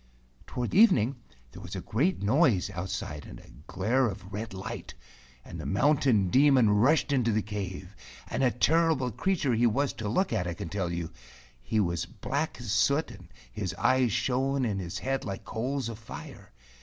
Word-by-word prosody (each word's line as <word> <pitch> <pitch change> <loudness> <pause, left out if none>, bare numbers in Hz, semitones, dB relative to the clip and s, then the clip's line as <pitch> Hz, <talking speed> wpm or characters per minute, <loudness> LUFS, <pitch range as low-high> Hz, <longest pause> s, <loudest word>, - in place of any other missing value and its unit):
Toward 125 -2 -3
evening 140 - +5 0.3
there - - -11
was - - -8
a - - -3
great 145 - 0
noise 115 - +3
out¬ 95 -1 -5
side 75 -7 -5
and - - -10
a - - -17 0.2
glare 120 +8 +1
of 95 -2 -7
red 110 +3 -4
light, 100 +5 -7 0.5
and - - -8
the - - -8
Mountain 125 -5 +2
Demon 130 -5 +5
rushed 135 +9 +3
into 125 -4 +2
the 110 -1 +1
cave, 95 -2 -6 0.3
and - - -2
a 130 - +5
terrible 150 0 +2
creature 160 - 0
he 120 +1 +3
was 135 +5 0
to 105 -2 -4
look 185 - +1
at, 95 -5 0
I 85 - -3
can 80 - -6
tell 95 -3 -2
you. 85 -1 -4 0.5
He 85 - -1
was 85 -5 0
as - - -19
black 145 +1 -3
as 120 -5 -5
soot, 140 +8 +2
and - - -13 0.2
his 95 -2 -4
eyes 130 +4 +2
shone 130 +3 0
in 100 -4 -1
his 85 -2 -5
head 135 +1 -2
like 100 -2 -6
coals 130 +4 -2
of 115 -2 -7
fire. 115 - -10
115 Hz, 190 wpm, -28 LUFS, 100-135 Hz, 0.5 s, evening